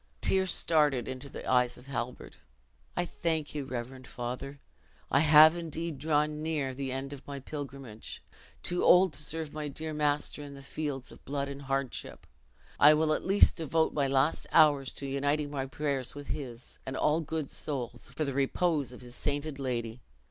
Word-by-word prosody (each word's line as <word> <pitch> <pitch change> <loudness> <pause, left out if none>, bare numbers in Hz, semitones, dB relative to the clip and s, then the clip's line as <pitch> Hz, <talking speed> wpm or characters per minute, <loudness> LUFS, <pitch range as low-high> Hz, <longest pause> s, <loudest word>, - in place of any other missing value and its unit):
Tears 190 -1 +3
started 150 -7 +2
into 130 +2 -6
the - - -8
eyes 125 -1 +3
of 125 - -14
Halbert. 125 -2 -5 0.6
"I - - +1
thank 160 -3 -2
you, 145 -2 -3
reverend 130 +1 -6
father; 125 +3 -5 0.5
I 135 - +5
have 155 +1 +8
indeed 165 -2 -4
drawn 150 0 +1
near 150 -4 -1
the 135 0 -4
end 135 +2 -4
of 140 - -11
my 140 -1 -5
pilgrimage 135 -5 -8 0.4
too 175 0 0
old 180 -2 +6
to 140 - -3
serve 160 0 -3
my 150 -1 -4
dear 155 +2 -5
master 150 0 0
in 140 -1 -9
fields 140 -2 -4
of - - -15
blood 140 0 -3
and 140 0 -7
hardship, 135 -1 -3 0.5
I 150 +1 +8
will 155 0 +2
at - - -2
least 195 +2 +5
devote 160 0 +1
my 140 -2 +1
last 135 +3 +1
hours 145 -4 +5
to 140 - -7
uniting 145 +2 0
my 135 -2 -2
prayers 140 -3 -2
with 145 0 -9
his, 130 -5 -6
and 130 0 -5
all 150 +2 +2
good 155 -2 -4
souls, 125 -5 -4
for 155 - 0
the 140 - -2
repose 140 +1 +1
of 125 - -11
his 120 -1 -10
sainted 145 +2 -2
lady. 120 -3 -3
140 Hz, 175 wpm, -30 LUFS, 135-155 Hz, 0.6 s, have